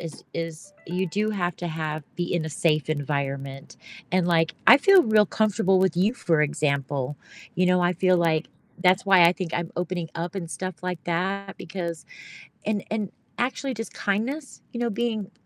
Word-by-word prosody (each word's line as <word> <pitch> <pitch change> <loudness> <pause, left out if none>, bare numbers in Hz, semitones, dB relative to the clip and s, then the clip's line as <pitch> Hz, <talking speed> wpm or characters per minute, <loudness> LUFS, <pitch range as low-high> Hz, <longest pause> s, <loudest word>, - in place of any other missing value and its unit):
is 165 -2 -8
is 165 +3 -5
you 180 +2 -1
do 210 +5 -1
have 175 -5 -1
to 175 - -4
have 155 -1 -3
be 175 0 -2
in 165 -2 0
a - - -3
safe 155 0 +1
environment, 140 -2 -3 0.3
and 180 -1 +2
like 165 -2 +2
I - - +11
feel 380 +4 +6
real 215 -1 +5
comfortable 205 -2 +2
with 190 -1 +2
you, 200 +6 +3
for 165 -10 +1
example. 145 -2 -1 0.4
You 180 0 +2
know, 180 0 +3
I 175 +1 +3
feel 185 +1 +3
like 165 -2 +1 0.3
that's 185 +2 +4
why 190 -3 +7
I 170 - +7
think 180 -3 -5
I'm 170 -1 -2
opening 175 -2 -3
up 170 +2 -4
and 170 -4 -5
stuff 185 -1 -5
like 180 -4 -3
that 195 +3 -2
because 170 -2 -5 0.6
and 210 -2 -1
and 210 -3 -2 0.3
actually 260 +2 -1
just 225 0 -6
kindness, 250 +9 -2
you 235 - -5
know, 235 -2 0
being 220 -2 -2
180 Hz, 180 wpm, -25 LUFS, 160-200 Hz, 0.6 s, I